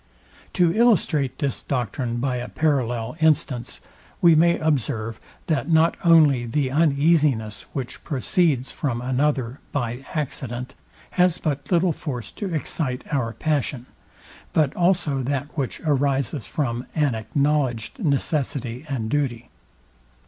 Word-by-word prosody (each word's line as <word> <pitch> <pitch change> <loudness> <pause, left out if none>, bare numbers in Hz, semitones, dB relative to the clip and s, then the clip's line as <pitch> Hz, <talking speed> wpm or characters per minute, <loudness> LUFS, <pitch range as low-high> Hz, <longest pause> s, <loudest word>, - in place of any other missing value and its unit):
To 175 -2 +3
illustrate 180 - +3
this 140 -5 -2
doctrine 120 -1 -2
by 125 0 -1
a 120 - -5
parallel 125 -6 0
instance, 150 -6 +1 0.4
we 170 -2 +6
may 170 +2 +4
observe, 115 -7 -1 0.3
that 155 -2 -1
not 160 +1 +4
only 150 -8 +5
the 130 +2 0
uneasiness, 145 -7 +2
which 130 -3 -5
proceeds 145 -1 +1
from 125 -5 -2
another 130 0 0
by 120 -1 -3
accident, 130 -4 -4 0.4
has 180 -2 +3
but 145 -1 -3
little 175 -1 +3
force 125 - -5
to 195 -3 -5
excite 150 -4 -2
our 125 -5 0
passion, 140 -5 -1 0.7
but 150 -3 +2
also 170 -6 +1
that 140 +3 -3
which 140 -5 -3
arises 140 - 0
from 125 -2 -2
an 150 -5 +2
acknowledged 135 - -1
necessity 140 -4 -1
and 120 -5 -2
duty. 125 -5 -1
140 Hz, 120 wpm, -23 LUFS, 125-155 Hz, 0.7 s, we